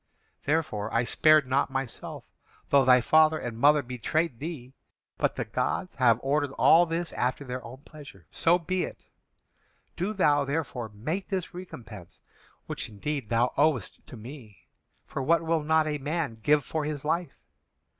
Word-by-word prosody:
Therefore 140 Hz, -9 st, -1 dB
I 115 Hz, -, +2 dB
spared 155 Hz, +4 st, +4 dB
not 130 Hz, +2 st, +1 dB
myself, 135 Hz, -2 st, -5 dB, 0.4 s
though 140 Hz, -1 st, +5 dB
thy 125 Hz, -1 st, +6 dB
father 155 Hz, +4 st, +4 dB
and 120 Hz, -6 st, -5 dB
mother 145 Hz, +4 st, +4 dB
betrayed 125 Hz, +3 st, -2 dB
thee. 140 Hz, -5 st, -7 dB, 0.5 s
But -, -, +1 dB
the -, -, -3 dB
gods 185 Hz, -, -2 dB
have 120 Hz, -4 st, +3 dB
ordered 145 Hz, +1 st, 0 dB
all 170 Hz, +4 st, +5 dB
this 165 Hz, +1 st, -3 dB
after 125 Hz, +3 st, -1 dB
their 125 Hz, 0 st, -5 dB
own 130 Hz, +4 st, -11 dB
pleasure. 150 Hz, -2 st, -13 dB
So 170 Hz, +1 st, +3 dB
be 180 Hz, +2 st, -2 dB
it. -, -, -8 dB, 0.9 s
Do 190 Hz, +5 st, -2 dB
thou 150 Hz, -8 st, +3 dB
therefore 140 Hz, -5 st, -3 dB
make 150 Hz, -, -4 dB
this 190 Hz, -1 st, -3 dB
recompense, 115 Hz, -, -10 dB, 0.5 s
which -, -, -5 dB
indeed 120 Hz, +3 st, -4 dB
thou 120 Hz, +2 st, +1 dB
owest 145 Hz, -8 st, +1 dB
to 125 Hz, -, -10 dB
me, 110 Hz, -4 st, -12 dB, 0.4 s
for 140 Hz, -, -5 dB
what 165 Hz, +5 st, +2 dB
will 165 Hz, -1 st, +1 dB
not 160 Hz, +1 st, +2 dB
a 150 Hz, -1 st, -2 dB
man 145 Hz, -5 st, -3 dB
give 145 Hz, +4 st, +3 dB
for 155 Hz, -1 st, -2 dB
his 150 Hz, -1 st, -4 dB
life? 165 Hz, -1 st, -1 dB
145 Hz, 160 wpm, -27 LUFS, 125-160 Hz, 0.9 s, thy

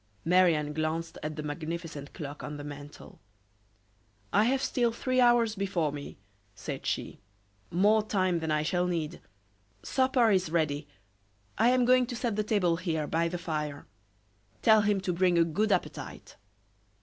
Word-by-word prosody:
Marie 180 Hz, 0 st, +5 dB
Anne 150 Hz, 0 st, -3 dB
glanced 160 Hz, +2 st, -3 dB
at 155 Hz, 0 st, -4 dB
the 150 Hz, -, -5 dB
magnificent 155 Hz, -1 st, -5 dB
clock 145 Hz, -3 st, -7 dB
on 150 Hz, 0 st, -5 dB
the 145 Hz, -, -7 dB
mantel. 145 Hz, 0 st, -10 dB, 1.1 s
"I 210 Hz, -, +4 dB
have 265 Hz, +2 st, +1 dB
still 240 Hz, -3 st, +1 dB
three 255 Hz, +2 st, 0 dB
hours 240 Hz, -2 st, +4 dB
before 190 Hz, -7 st, -1 dB
me," 145 Hz, 0 st, -8 dB, 0.4 s
said -, -, -6 dB
she; -, -, -3 dB, 0.5 s
"more 210 Hz, +5 st, +4 dB
time 185 Hz, -5 st, 0 dB
than 160 Hz, -1 st, -3 dB
I 150 Hz, 0 st, +1 dB
shall 175 Hz, +3 st, 0 dB
need. 165 Hz, -4 st, -3 dB, 0.6 s
Supper 260 Hz, -4 st, +2 dB
is 185 Hz, -4 st, +2 dB
ready; 155 Hz, -3 st, 0 dB, 0.7 s
I 230 Hz, +3 st, +4 dB
am 250 Hz, -1 st, +3 dB
going 250 Hz, 0 st, +4 dB
to 245 Hz, -, -5 dB
set 235 Hz, -3 st, -2 dB
the 215 Hz, -, 0 dB
table 190 Hz, -6 st, +1 dB
here, 165 Hz, -4 st, -2 dB
by 165 Hz, +2 st, 0 dB
the 175 Hz, +1 st, -3 dB
fire. 150 Hz, -4 st, -4 dB, 0.8 s
Tell 220 Hz, -1 st, +6 dB
him 205 Hz, -2 st, +1 dB
to 185 Hz, -1 st, -1 dB
bring 180 Hz, 0 st, +2 dB
a 170 Hz, -, +6 dB
good 205 Hz, +7 st, 0 dB
appetite." 185 Hz, -, -3 dB
175 Hz, 160 wpm, -29 LUFS, 155-215 Hz, 1.1 s, Tell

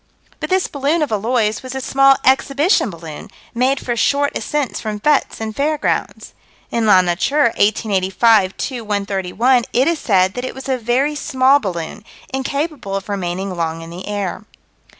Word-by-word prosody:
But -, -, -4 dB
this 375 Hz, 0 st, +2 dB
balloon 290 Hz, +3 st, 0 dB
of 290 Hz, -, -3 dB
Eloy's 215 Hz, 0 st, 0 dB
was 255 Hz, 0 st, -7 dB
a -, -, -2 dB
small 275 Hz, +1 st, +4 dB
exhibition 275 Hz, -, +3 dB
balloon, 165 Hz, -4 st, -9 dB, 0.2 s
made 260 Hz, +3 st, +1 dB
for 240 Hz, -, -3 dB
short 285 Hz, +4 st, +1 dB
ascents 295 Hz, -3 st, -2 dB
from 215 Hz, -2 st, -4 dB
fêtes 295 Hz, +5 st, +1 dB
and 220 Hz, -1 st, -5 dB
fair 300 Hz, +2 st, 0 dB
grounds. -, -, -2 dB, 0.4 s
In 230 Hz, -2 st, 0 dB
La 190 Hz, -3 st, +7 dB
Nature, 225 Hz, +9 st, +1 dB
1885 200 Hz, 0 st, +2 dB
2 250 Hz, -4 st, -4 dB
131, 205 Hz, +4 st, +1 dB
it 255 Hz, +3 st, +3 dB
is 335 Hz, -2 st, +1 dB
said 190 Hz, -3 st, +2 dB
that 245 Hz, -, -5 dB
it 255 Hz, -, -5 dB
was 265 Hz, 0 st, -8 dB
a 260 Hz, -1 st, 0 dB
very 250 Hz, +6 st, +1 dB
small 270 Hz, -1 st, +3 dB
balloon, 180 Hz, -, -5 dB, 0.3 s
incapable 275 Hz, -5 st, -3 dB
of 195 Hz, +1 st, -5 dB
remaining 190 Hz, -1 st, -3 dB
long 165 Hz, -1 st, -3 dB
in 165 Hz, -, -10 dB
the 180 Hz, +2 st, -8 dB
air. 205 Hz, -2 st, -3 dB
235 Hz, 170 wpm, -18 LUFS, 195-275 Hz, 0.4 s, La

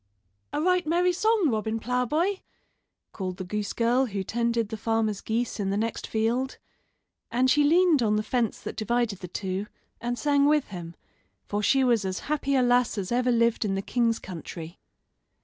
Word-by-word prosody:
"A 295 Hz, -, -2 dB
right 360 Hz, +1 st, +2 dB
merry 355 Hz, +3 st, +2 dB
song, 430 Hz, -2 st, +2 dB
Robin 220 Hz, 0 st, -1 dB
Ploughboy," 275 Hz, -, 0 dB, 0.7 s
called 185 Hz, -2 st, -5 dB
the -, -, -4 dB
goose 205 Hz, +2 st, -3 dB
girl 245 Hz, +3 st, +2 dB
who 200 Hz, -3 st, -3 dB
tended 235 Hz, +1 st, 0 dB
the 220 Hz, -, -4 dB
farmer's 220 Hz, -2 st, -1 dB
geese 230 Hz, +1 st, -2 dB
in 195 Hz, -1 st, -1 dB
the 200 Hz, -, 0 dB
next 225 Hz, +1 st, -2 dB
field; 235 Hz, +4 st, -1 dB, 0.7 s
and 255 Hz, +2 st, +2 dB
she 295 Hz, -, +4 dB
leaned 330 Hz, -1 st, +4 dB
on 215 Hz, -2 st, +2 dB
the 215 Hz, -, 0 dB
fence 235 Hz, -1 st, -1 dB
that -, -, -6 dB
divided 225 Hz, -2 st, -1 dB
the 180 Hz, -, -7 dB
two, 190 Hz, +2 st, -3 dB, 0.3 s
and 240 Hz, +1 st, -2 dB
sang 285 Hz, 0 st, +3 dB
with 300 Hz, -2 st, +2 dB
him, 170 Hz, -3 st, -7 dB, 0.5 s
for 205 Hz, 0 st, -2 dB
she 270 Hz, +5 st, +3 dB
was 235 Hz, -4 st, +3 dB
as 190 Hz, 0 st, -3 dB
happy 280 Hz, -2 st, -1 dB
a 260 Hz, -, +4 dB
lass 245 Hz, -2 st, +2 dB
as 195 Hz, 0 st, -3 dB
ever 250 Hz, +1 st, +2 dB
lived 235 Hz, -1 st, +2 dB
in 195 Hz, -2 st, -1 dB
the 195 Hz, -, -1 dB
king's 230 Hz, -1 st, +1 dB
country. 170 Hz, -1 st, -8 dB
235 Hz, 185 wpm, -26 LUFS, 210-265 Hz, 0.7 s, she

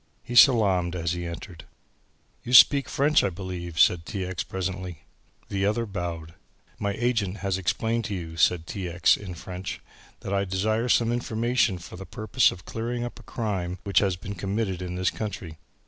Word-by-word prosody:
He 120 Hz, -, -7 dB
salaamed 100 Hz, -9 st, +5 dB
as 85 Hz, -1 st, -1 dB
he 90 Hz, -1 st, -3 dB
entered. 85 Hz, +1 st, -8 dB, 0.8 s
"You 125 Hz, -, -5 dB
speak 140 Hz, +2 st, +8 dB
French, 150 Hz, +2 st, +3 dB
I -, -, +2 dB
believe," 90 Hz, -2 st, -6 dB
said 85 Hz, -2 st, +5 dB
T. 95 Hz, +2 st, -4 dB
X. 95 Hz, -1 st, -3 dB
presently. 95 Hz, -3 st, -5 dB, 0.5 s
The 95 Hz, -1 st, -1 dB
other 110 Hz, +4 st, +1 dB
bowed. 85 Hz, -5 st, -5 dB, 0.5 s
"My 100 Hz, -1 st, -1 dB
agent 110 Hz, -4 st, 0 dB
has 95 Hz, -1 st, 0 dB
explained 115 Hz, +5 st, -1 dB
to 100 Hz, -, -3 dB
you," 80 Hz, -3 st, -6 dB
said 85 Hz, 0 st, +2 dB
T. 90 Hz, 0 st, -5 dB
X. 85 Hz, +1 st, +4 dB
in 95 Hz, -4 st, -8 dB
French, 90 Hz, +1 st, -6 dB, 0.4 s
"that 100 Hz, -, -4 dB
I 100 Hz, 0 st, +2 dB
desire 110 Hz, +5 st, 0 dB
some 115 Hz, 0 st, +3 dB
information 120 Hz, -3 st, +1 dB
for 90 Hz, +1 st, -10 dB
the 95 Hz, 0 st, -9 dB
purpose 110 Hz, +6 st, +2 dB
of 90 Hz, -, -9 dB
clearing 120 Hz, +2 st, -3 dB
up 120 Hz, -, -6 dB
a -, -, -12 dB
crime 95 Hz, -6 st, -3 dB
which 100 Hz, -, +3 dB
has 95 Hz, -3 st, +1 dB
been 90 Hz, +3 st, -7 dB
committed 95 Hz, 0 st, -2 dB
in 90 Hz, -1 st, -4 dB
this 95 Hz, +1 st, +1 dB
country. 90 Hz, -7 st, -6 dB
95 Hz, 180 wpm, -26 LUFS, 90-110 Hz, 0.8 s, speak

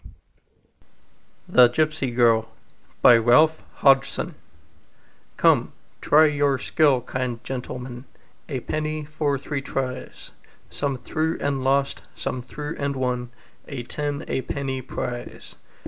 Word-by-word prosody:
Y -, -, -13 dB
Z -, -, -19 dB, 1.3 s
The 125 Hz, -1 st, +7 dB
Gipsy 155 Hz, +1 st, 0 dB
Girl 115 Hz, -2 st, +3 dB, 0.5 s
"COME, 125 Hz, +7 st, +6 dB, 2.5 s
try 155 Hz, +2 st, +6 dB
your 145 Hz, -2 st, +2 dB
skill, 140 Hz, -2 st, +2 dB
kind 125 Hz, -1 st, -4 dB
gentlemen, 125 Hz, -1 st, -6 dB, 0.4 s
A 130 Hz, -4 st, -3 dB
penny 155 Hz, +1 st, -3 dB
for 150 Hz, -2 st, -1 dB
three 140 Hz, +1 st, -4 dB
tries!" 130 Hz, -2 st, -5 dB, 0.4 s
Some 140 Hz, -2 st, -2 dB
threw 155 Hz, +6 st, -2 dB
and 140 Hz, -2 st, -1 dB
lost, 140 Hz, +1 st, +1 dB
some 125 Hz, -, -4 dB
threw 150 Hz, +5 st, -6 dB
and 140 Hz, 0 st, -1 dB
won 125 Hz, -2 st, -2 dB, 0.4 s
A 135 Hz, -4 st, -5 dB
ten 145 Hz, +3 st, -4 dB
a -, -, -1 dB
penny 135 Hz, -1 st, -3 dB
prize. 120 Hz, -1 st, -6 dB
135 Hz, 110 wpm, -24 LUFS, 125-145 Hz, 2.5 s, The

